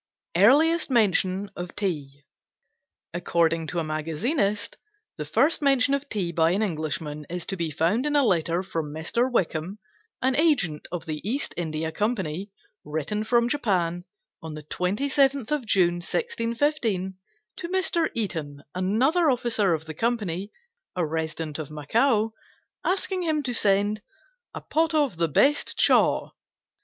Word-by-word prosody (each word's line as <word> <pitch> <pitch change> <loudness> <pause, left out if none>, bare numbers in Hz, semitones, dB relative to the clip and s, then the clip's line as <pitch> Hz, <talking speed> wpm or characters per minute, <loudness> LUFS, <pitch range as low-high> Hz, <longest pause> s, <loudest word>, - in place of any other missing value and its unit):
EARLIEST 295 - +5
MENTION 200 -4 +2
OF 175 0 -6
TEA 145 -9 -3 0.9
According 165 -2 +1
to 175 - -4
a 165 - +1
magazinist, 195 - -1 0.4
the - - -4
first 310 +3 +2
mention 275 -1 +3
of 280 0 -2
tea 190 -5 -1
by 165 -1 +3
an 205 +4 +1
Englishman 155 -4 -3
is 175 0 -4
to 195 - -3
be 170 -3 -2
found 175 - +1
in 295 - 0
a 285 -2 +4
letter 170 -3 +1
from 165 -5 -4
Mr. 200 - -1
Wickham, 180 -3 -1 0.4
an 260 0 +1
agent 260 - +2
of 170 -2 -4
the 155 -2 -4
East 255 +8 -2
India 160 -1 -2
Company, 195 -2 -2 0.3
written 160 +8 -2
from 235 +1 +3
Japan, 180 - 0 0.4
on 160 -1 -7
the 155 - -8
27th 270 - +1
of 290 -6 -1
June, 175 -4 +3
1615, 230 - -1 0.4
to 340 - -4
Mr. 355 -3 +1
Eaton, 160 -10 -3
another 255 - +2
officer 225 -8 +2
of 160 0 -7
the 160 - -6
company, 205 -2 -2 0.4
a 180 -2 +1
resident 160 0 -3
of 155 - -5
Macao, 220 - +1 0.5
asking 380 0 -1
him 310 -3 0
to 250 -2 -2
send 205 0 +2 0.5
"a - - -5
pot 320 0 +1
of 285 - +1
the 165 0 +2
best 280 - +2
chaw." - - +3
195 Hz, 145 wpm, -26 LUFS, 165-255 Hz, 0.9 s, EARLIEST